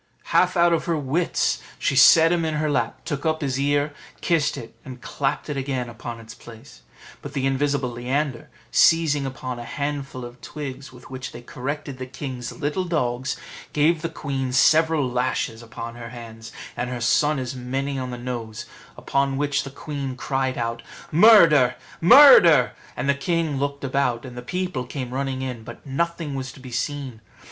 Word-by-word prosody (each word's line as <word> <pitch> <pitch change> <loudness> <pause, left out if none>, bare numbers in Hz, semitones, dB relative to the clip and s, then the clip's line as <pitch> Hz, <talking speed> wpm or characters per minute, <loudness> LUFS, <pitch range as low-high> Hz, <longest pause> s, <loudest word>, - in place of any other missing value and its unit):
Half 180 0 +3
out 170 0 +5
of 165 - 0
her 170 -2 0
wits, 150 +5 0 0.2
she - - 0
set 160 +5 +7
him 175 -1 +1
in 160 -1 -1
her 150 0 0
lap, - - -2
took 145 -3 -3
up 160 -1 0
his 135 -2 -1
ear, 145 +1 +1 0.3
kissed 165 -4 +1
it, 115 0 -9
and 130 -1 -9
clapped 135 +2 -2
it 150 - -3
again 130 -3 -2
upon 115 0 -7
its 115 0 -11
place; 110 - -14 0.4
but - - -8
the 135 -2 -1
invisible 135 -1 0
Leander, 130 +2 -2 0.2
seizing 150 -4 +4
upon 125 -1 -6
a - - -6
handful 140 -1 -4
of 120 +1 -12
twigs, 140 -2 -7
with 125 0 -15
which 130 +1 -6
they 120 - -10
corrected 140 +2 -5
the 130 - -5
king's 130 -2 -6
little 155 +3 -2
dogs, 130 -6 -1 0.4
gave 155 +2 +2
the 165 - -2
queen 135 -5 -3
several 155 +2 +4
lashes 125 -2 -1
upon 115 0 -7
her 115 -1 -9
hands, 115 -1 -10 0.2
and 125 - -3
her 125 -1 -4
son 145 +5 +2
as 130 -1 -3
many 135 +2 -3
on 130 -1 -4
the 125 - -5
nose: 120 -3 -5 0.3
upon 140 -1 0
which 145 0 0
the 140 - -7
queen 140 -1 -5
cried 130 0 -2
out, 115 0 -2 0.3
"Murder! 165 - +7 0.3
murder!" 175 - +8 0.3
and 125 - -2
the 140 - +4
king 155 0 -1
looked 140 0 -3
about, 130 -2 0
and 125 -1 -9
the 125 - -6
people 180 0 -3
came 125 0 -6
running 135 -1 -2
in; 125 -4 -5
but - - -11
nothing 165 +2 -2
was 130 -1 -4
to - - -15
be 130 -1 -10
seen. 130 -1 -4
135 Hz, 180 wpm, -23 LUFS, 125-150 Hz, 0.4 s, murder